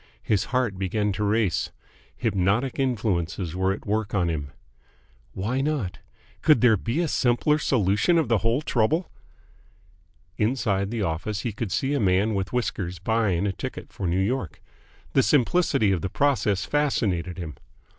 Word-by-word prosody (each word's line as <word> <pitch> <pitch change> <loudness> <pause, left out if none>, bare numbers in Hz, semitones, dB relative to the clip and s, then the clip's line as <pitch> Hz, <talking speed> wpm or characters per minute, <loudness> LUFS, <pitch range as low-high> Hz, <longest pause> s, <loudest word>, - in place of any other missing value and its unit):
His 105 -3 +1
heart 125 -7 -1
began 105 +2 0
to 105 +2 -2
race. 105 -4 +1 0.5
Hypnotic 110 +4 0
influences 95 -9 -1
were 95 +1 +1
at 95 - -5
work 105 0 -1
on 90 -3 +2
him. 70 -3 -4 0.8
Why 115 +8 -1
not? 140 -11 -2 0.4
Could 150 -8 +5
there 120 -3 +6
be 115 - -1
a 170 - 0
simpler 140 +3 +2
solution 115 - +2
of 160 -5 +2
the 115 -2 +2
whole 115 +8 0
trouble? 150 +8 +1 1.3
Inside 105 -4 +1
the 115 -2 -2
office 95 +5 -2
he 120 -4 -3
would 115 -5 -2
see 135 +8 0
a 145 - +1
man 100 +2 +2
with 95 -1 -2
whiskers 95 -7 -2
buying 100 -1 +1
a 100 - +1
ticket - - -7
for 95 - -3
New 85 +2 +1
York. 100 - -2 0.5
The 135 - +5
simplicity 140 - +3
of 90 -4 0
the 95 - -2
process 105 -7 +1
fascinated 100 - 0
him. 80 -4 -5
105 Hz, 155 wpm, -25 LUFS, 95-125 Hz, 1.3 s, there